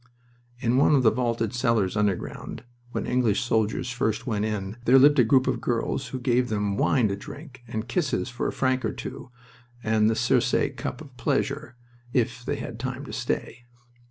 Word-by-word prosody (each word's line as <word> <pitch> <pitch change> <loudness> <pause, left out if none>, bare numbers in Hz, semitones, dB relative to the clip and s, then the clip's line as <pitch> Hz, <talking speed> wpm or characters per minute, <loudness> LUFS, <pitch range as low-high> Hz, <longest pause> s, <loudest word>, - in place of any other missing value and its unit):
In 125 0 +1
one 145 +2 +5
of 135 - +3
the 110 - +6
vaulted 115 -2 -1
cellars 115 -6 +1
underground, 105 -3 -2 0.3
when - - -2
English 120 -5 +2
soldiers 110 0 0
first 110 -2 -1
went 105 -4 -1
in, 105 0 -3
there 125 +3 +7
lived 145 +2 +6
a - - +8
group 130 +3 +4
of 125 -3 -1
girls 120 +2 -1
who 130 +1 -5
gave 125 0 +1
them 105 -2 0
wine 120 +3 +3
to 100 - -1
drink, 130 +5 -10
and 110 -1 -4
kisses 145 +1 0
for 120 -1 -3
a - - -1
franc 130 -1 0
or - - -1
two, - - -7 0.5
and 110 0 +3
the 110 - +1
Circe - - +2 0.2
cup 125 - -5
of 135 -5 -13
pleasure, 140 +2 -1 0.4
if 125 -1 0
they - - -2
had 115 -1 -6
time 130 +3 -4
to - - -8
stay. 125 -1 -3
120 Hz, 185 wpm, -26 LUFS, 110-130 Hz, 0.5 s, a